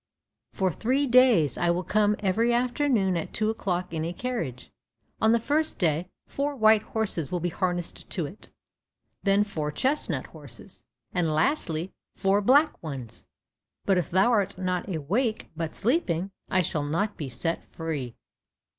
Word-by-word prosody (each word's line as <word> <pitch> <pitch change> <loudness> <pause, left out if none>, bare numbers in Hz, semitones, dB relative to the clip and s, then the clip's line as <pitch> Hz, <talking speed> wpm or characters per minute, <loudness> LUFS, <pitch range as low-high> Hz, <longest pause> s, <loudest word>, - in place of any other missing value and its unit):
For 190 -1 0
three 260 - +1
days 240 - +4
I 175 - +2
will 175 +2 +1
come 210 +2 +2
every 220 +4 +2
afternoon 240 -5 +1
at 165 - -4
two 215 0 +1
o'clock 180 -5 -3
in 160 -1 -2
a 165 - -2
carriage. 175 - -4 0.5
On 220 - +5
the 235 - +4
first 300 +6 0
day 170 0 0 0.2
four 285 +1 -2
white 220 -3 +5
horses 205 -11 -2
will 180 - 0
be 175 +1 -1
harnessed 175 0 -3
to 175 -5 -2
it, 185 +9 -11 0.7
then 200 0 +3
four 155 -8 -3
chestnut 270 - 0
horses, - - -12 0.3
and 175 -3 +1
lastly 165 - 0 0.2
four 195 +1 +2
black 280 +9 +4
ones; 135 -8 -7 0.6
but 190 -2 +3
if 175 - -3
thou 190 +7 +4
art 205 -6 +1
not 180 0 -2
awake, 210 - -1
but 165 -1 -4
sleeping, 195 - 0 0.2
I 185 -1 +3
shall 155 -2 -1
not 170 +9 -1
be 145 -4 -5
set 165 +7 -2
free." 145 -8 -5
190 Hz, 155 wpm, -27 LUFS, 165-225 Hz, 0.7 s, On